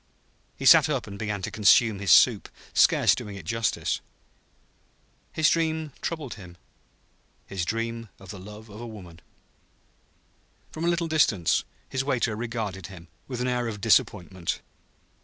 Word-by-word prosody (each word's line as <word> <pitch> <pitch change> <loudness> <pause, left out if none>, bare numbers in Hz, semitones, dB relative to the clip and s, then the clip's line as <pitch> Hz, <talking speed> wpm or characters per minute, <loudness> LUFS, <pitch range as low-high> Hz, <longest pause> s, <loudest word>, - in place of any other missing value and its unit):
He - - -6
sat - - +8
up - - -1
and 100 0 -9
began 105 -3 -3
to - - -3
consume 110 0 +4
his 100 -1 0
soup, - - +5 0.2
scarce - - +5
doing 105 -1 -6
it 95 -5 -10
justice. 115 +4 -1 1.3
His 160 -1 +2
dream 160 -2 0
troubled 155 -7 -4
him 90 -4 -12 0.9
his 95 -3 -4
dream 115 +2 -3
of 95 -2 -15
the 100 - -9
love 105 +3 -11
of 105 0 -11
woman. 90 -6 -12 1.5
From 160 +1 -4
a - - +3
little 170 -1 0
distance 115 - +2 0.2
his 130 0 -2
waiter 125 -5 0
regarded 110 -5 -4
him, 85 -4 -13 0.2
with 125 -2 -5
an 125 - 0
air 125 -1 -1
of 105 -2 -5
disappointment. 95 -4 +1
110 Hz, 145 wpm, -26 LUFS, 95-125 Hz, 1.5 s, sat